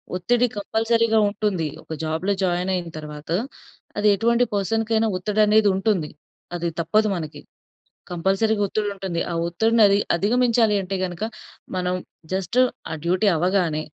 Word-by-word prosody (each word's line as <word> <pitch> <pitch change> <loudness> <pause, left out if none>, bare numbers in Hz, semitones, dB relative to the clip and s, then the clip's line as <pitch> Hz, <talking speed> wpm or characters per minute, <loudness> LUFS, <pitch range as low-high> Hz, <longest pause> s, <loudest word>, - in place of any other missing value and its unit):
ఒత్తిడి 240 +7 +2
కంపల్సరీగా 225 +2 +1
ఉంటుంది. 200 -6 -1 0.2
ఒక 160 - -7
జాబ్‌లో 160 +5 -1
జాయిన్ 180 +1 0
అయిన 175 -2 -4
తరువాత 150 0 -9 0.7
అది 210 0 +2
ఎటువంటి 235 +4 +2
పర్సన్‌కీ 225 +3 -1
అయిన 220 0 +2
ఒత్తిడనేది 210 +2 +3
ఉంటుంది. 190 -5 0 0.5
అది 170 0 -2
తప్పదు 215 +6 +2
మనకి. 155 -3 -6 0.7
కంపల్సరీగా 195 +5 +1
ఒత్తిడి 210 +1 -1
ఉంటుంది. 185 -3 -3
ఆ - - -2
ఒత్తిడిని 225 +7 +2
అదిగ 200 +1 +3
అధిగమించాలంటే 215 -2 +2
గనుక 180 +3 -6 0.5
మనం 180 0 -1 0.4
జస్ట్ 190 +6 0 0.3
ఆ - - -2
డ్యూటీ 185 +4 +2
అవ్వగానే 175 -2 +1
195 Hz, 130 wpm, -23 LUFS, 175-220 Hz, 0.7 s, ఒత్తిడనేది